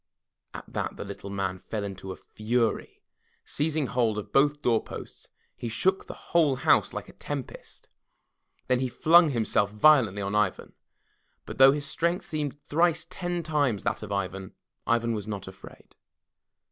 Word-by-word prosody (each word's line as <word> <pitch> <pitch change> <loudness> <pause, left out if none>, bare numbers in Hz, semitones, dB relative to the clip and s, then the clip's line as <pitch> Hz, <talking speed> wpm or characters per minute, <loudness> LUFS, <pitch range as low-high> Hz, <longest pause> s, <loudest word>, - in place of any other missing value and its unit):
At - - -7
that - - -3
the - - -6
Little 100 - -8
Man 95 -2 -3
fell 105 +1 -5
into 95 -1 -6
a - - -6
fury. 115 0 -2 0.4
Seizing 155 0 0
hold 115 -2 0
of 105 - -6
both 145 +2 +3
doorposts 115 -2 -2 0.3
he 120 - -5
shook 190 - 0
the - - -7 0.2
whole 155 -6 +4
house 135 - +3
like - - -6
a - - -14
tempest. 140 -4 -7 0.8
Then 125 -1 +2
he 130 - 0
flung 165 +5 +5
himself 110 -5 +1
violently 105 -3 +4
on 100 +1 -3
Ivan. 105 -3 0 0.7
But - - -9
though 135 0 +9
his 145 0 -2
strength 170 +4 -1
seemed 150 -2 -3
thrice 165 +2 +1
ten 175 -2 -3
times 145 -9 0
that 100 - -1
of 105 -2 -7
Ivan, 95 -1 -4 0.3
Ivan 115 0 +1
was 105 -2 -4
not 100 -3 -5
afraid. 95 - -13
120 Hz, 160 wpm, -27 LUFS, 100-150 Hz, 0.8 s, though